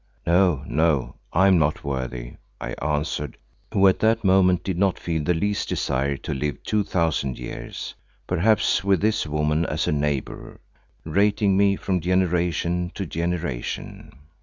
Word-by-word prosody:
"No, 85 -4 +3
no, 75 -5 +1 0.2
I 95 +3 +4
am 95 -3 +5
not 75 0 0
worthy," 65 -4 -4 0.2
I - - -5
answered, 75 -1 -2 0.3
who 95 0 +5
at 95 - +3
that 110 +1 +2
moment 95 -2 +4
did 95 -3 -2
not 95 -2 +2
feel 80 -3 -2
the 90 +3 +1
least 105 +4 -1
desire 70 +2 -1
to - - -5
live 75 +2 -3
two 105 -1 +1
thousand 80 -8 -1
years, - - -7 0.3
perhaps 100 +2 +2
with 100 -2 +3
this 110 -4 +1
woman 75 +1 +1
as - - -1
a - - +2
neighbour, 75 -2 -3 0.5
rating 100 +3 +2
me 100 0 +4
from 95 -1 -1
generation 90 -1 0
to 95 - -3
generation. 85 -6 -4
85 Hz, 150 wpm, -24 LUFS, 75-95 Hz, 0.5 s, am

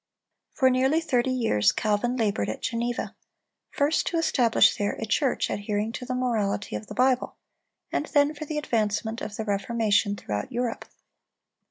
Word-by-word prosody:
For 260 -1 +3
nearly 265 +5 +3
thirty 260 -6 0
years, 225 - +2
Calvin 215 +4 0
labored 205 - 0
at 110 - -5
Geneva; 235 0 -2 0.5
first 290 +2 +1
to 340 - 0
establish 250 -8 +4
there 205 0 -1
a 225 - -5
church 265 +4 +1
adhering 205 +1 -2
to 250 - -6
the 255 0 -3
morality 215 - -1
of 105 0 -6
the - - -8
Bible, 255 0 +2 0.6
and - - -1
then 290 0 +3
for 305 +1 -7
the 305 0 -4
advancement 220 -4 -1
of 210 - -5
the 220 - -4
Reformation 205 0 +1
throughout 105 - -4
Europe. 240 -1 -2
235 Hz, 160 wpm, -26 LUFS, 205-255 Hz, 0.6 s, establish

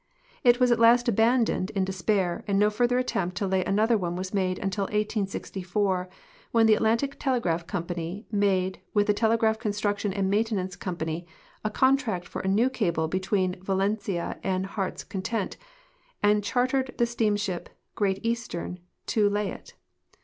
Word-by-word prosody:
It 245 -1 +5
was 250 -1 +4
at 235 - +3
last 240 +2 +6
abandoned 225 -3 +2
in 190 -1 +2
de 190 - -3
spair, 185 -1 0
and 200 -1 +1
no 210 +1 +4
further 245 +3 +2
attempt 185 -8 -1
to 200 - 0
lay 190 -1 +1
another 215 +3 +2
one 175 -2 -2
was 185 +2 -5
made 185 -2 0
until 195 0 -2
18(>4, 195 -2 -1 0.4
when 230 -1 +4
the 220 - +6
Atlantic 230 +6 +1
Telegraph 180 - 0
Company 175 +1 -4
made 190 -3 +1 0.2
with 205 0 +4
the 210 - +3
Telegraph 220 0 +2
Construction 205 -1 -1
and 195 0 -1
INIaintenance 205 -4 0
Company 170 -1 -4 0.4
a 215 - 0
contract 230 -7 +1
for - - -5
a - - -4
new 210 +6 +3
cable 170 -10 0
between 185 +1 -1
Valentia 195 -1 -1
and 190 0 -1
Heart's 195 -1 -4
Content 195 +2 -3 0.7
and 205 0 +4
char 245 +4 +2
tered 260 0 -1
the 240 - +3
steamship 210 -5 -1 0.2
Great 195 0 -1
Eastern 230 -6 -3 0.3
to 210 -2 +2
lay 205 0 -1
it. - - -11
205 Hz, 160 wpm, -27 LUFS, 185-225 Hz, 0.7 s, last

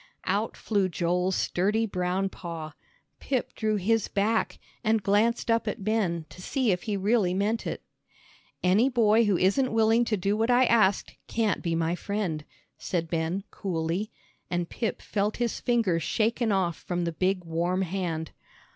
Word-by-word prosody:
Out 205 +4 -1
flew 200 -4 0
Joel's 180 +2 0
sturdy 210 +5 +1
brown 185 -1 -1
paw. 165 -5 -7 0.5
Pip 260 -3 -2
drew 215 -1 0
his 215 +2 +1
back, 215 +3 0 0.3
and 220 -2 +2
glanced 225 +4 +2
up 230 0 +1
at 205 - -3
Ben 190 -7 0
to 180 - -11
see 255 +2 0
if 180 -1 0
he 205 - 0
really 195 -2 +2
meant 210 +4 0
it. - - -4 0.8
"Any 200 +8 +4
boy 230 -2 +4
who 200 -3 +2
isn't 200 +9 +2
willing 225 +1 +4
to 215 -2 0
do 195 +3 0
what 225 +2 0
I 250 +1 +5
asked, 215 -5 +2
can't 225 -3 0
be 170 -2 -1
my 165 0 0
friend," 180 -5 -3 0.4
said 165 -3 -2
Ben, 165 +3 -1
coolly, 175 +2 -2 0.4
and 175 -1 -1
Pip 225 +4 -3
felt 210 +1 -1
his 240 -2 -1
fingers 225 -9 +1
shaken 225 +4 0
off 180 -4 +1
from 175 -1 -3
the 170 - -1
big 185 +2 0
warm 175 +3 0
hand. 170 -3 -3
200 Hz, 165 wpm, -27 LUFS, 175-225 Hz, 0.8 s, I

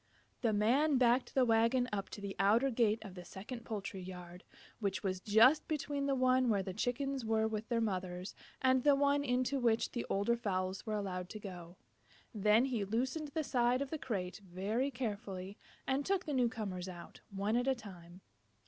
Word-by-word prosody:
The 230 - +2
Man 260 +8 +3
backed 250 0 +2
the 260 -2 +5
wagon 230 +2 +3
up 195 -1 -2
to 205 - -8
the 200 -1 -5
outer 225 +7 +4
gate 225 -2 +2
of 195 - -8
the 180 -1 -9
second 215 +7 -8
poultry 200 -3 -5
yard, 180 -1 -9 0.4
which 195 -4 -2
was 185 -2 -1
just 225 +10 +5
between 290 -2 -2
the 275 - +2
one 255 -1 +3
where 200 -3 +2
the 190 - -5
Chickens 265 +5 -1
were 220 0 +1
with 220 0 -4
their 235 -2 +1
mothers 185 -3 -3 0.3
and 260 0 +4
the 290 -1 +6
one 285 0 +2
into 255 +1 0
which 230 -2 +2
the 240 - -4
older 205 +4 +2
fowls 190 -2 -2
were 215 - -1
allowed 185 -3 -3
to 215 - -7
go. 180 -4 -9 0.6
Then 215 +3 +4
he 245 -6 -1
loosened 260 +9 -1
the 310 +2 -2
side 245 -2 +2
of 275 - -9
the 315 - -3
crate 195 -6 -4
very 200 +9 -1
carefully 205 -6 -5 0.3
and 270 +1 0
took 380 +3 0
the 295 - -3
new 250 -3 +3
comers 190 -6 -5
out, 175 -2 -10
one 200 +2 -1
at 245 +2 +1
a 265 - +3
time. 185 -5 -12
225 Hz, 195 wpm, -34 LUFS, 195-255 Hz, 0.6 s, the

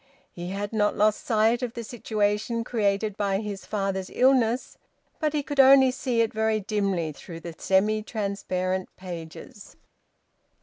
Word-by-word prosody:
He 175 0 -7
had 200 +2 -4
not 210 -1 +1
lost 210 0 +2
sight 225 +2 +2
of 245 -2 -4
the 235 - -4
situation 220 0 -1
created 210 -3 0
by 200 -2 0
his 205 -2 -6
father's 195 -2 -2
illness, 255 -2 +2 0.4
but 305 -2 0
he 295 -1 0
could 285 0 -5
only 265 -1 +7
see 250 -2 0
it 225 - 0
very 220 0 +1
dimly 195 -6 -1
through 165 +3 -10
the 170 0 -7
semi 210 +5 +2
transparent 190 -4 -2
pages. 180 +5 -9
210 Hz, 145 wpm, -26 LUFS, 195-230 Hz, 0.4 s, only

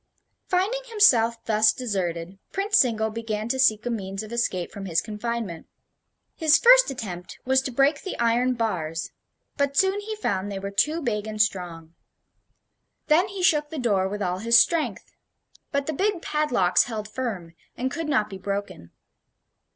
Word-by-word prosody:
Finding 390 +8 0
himself 245 - +3
thus 215 0 +4
deserted, 185 -6 -4
Prince 405 +1 +2
Zingle 220 -3 +1
began 220 -1 -4
to 265 - -1
seek 220 -3 +3
a 245 - -1
means 195 -2 -4
of 215 +2 -9
escape 185 -7 -1
from 195 -1 -7
his 165 -2 +1
confinement. 215 -3 -5 0.7
His 315 -3 +4
first - - +6
attempt 195 -9 -7
was 265 +1 +3
to 265 - -5
break 275 +4 +2
the 380 - -6
iron 240 +2 +2
bars; 165 -8 -3 0.5
but 280 -1 0
soon 385 +1 +3
he 430 +1 -5
found 200 - -2
they 195 - -4
were 195 +1 -5
too 305 +11 +1
big 215 -4 -2
and 215 0 -6
strong. 175 -6 -1 1.2
Then 335 +6 +4
he 390 -2 -6
shook 300 -4 +3
the 320 - -7
door 205 -7 +1
with 205 +1 -4
all 180 0 -2
his 230 +2 +5
strength; 330 +2 0 0.6
but 280 -2 -1
the 315 - -3
big 390 +2 -1
padlocks 250 -12 +2
held 215 -3 -5
firm, 210 -8 -5 0.2
and 260 +2 -2
could 325 +1 -4
not 255 -8 +2
be 195 -2 -9
broken. 200 - -5
230 Hz, 165 wpm, -25 LUFS, 200-295 Hz, 1.2 s, first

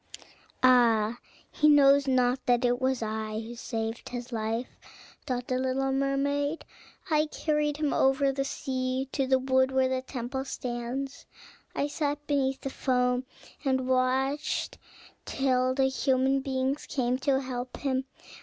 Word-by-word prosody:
"Ah, 235 -3 +4 0.3
he 300 - +3
knows 280 -1 +6
not 255 0 +2
that 245 0 +3
it 245 +1 +1
was 260 -2 +1
I 215 0 -3
who 225 +1 -7
saved 225 -1 -4
his 245 0 -6
life," 225 +2 -3 0.5
thought 250 -2 -2
the 255 0 0
little 265 +1 0
mermaid. 280 +3 0 0.5
"I 305 0 +3
carried 300 -1 -1
him 300 -2 0
over 270 +1 +3
the 275 0 -1
sea 260 -1 -2
to 270 -2 0
the 265 0 +4
wood 260 0 +2
where 265 0 +2
the 260 0 -1
temple 260 0 -4
stands: 255 +2 -5 0.5
I - - +1
sat 295 0 -2
beneath 270 -2 0
the 270 - -4
foam, 250 -1 +1 0.4
and 260 -2 0
watched 260 +3 0 0.5
till 255 -1 +1
the 270 -1 +3
human 265 0 +2
beings 265 +1 -2
came 255 -1 0
to 270 0 +2
help 250 -1 -5
him. 265 -2 -1
260 Hz, 145 wpm, -28 LUFS, 250-275 Hz, 0.5 s, knows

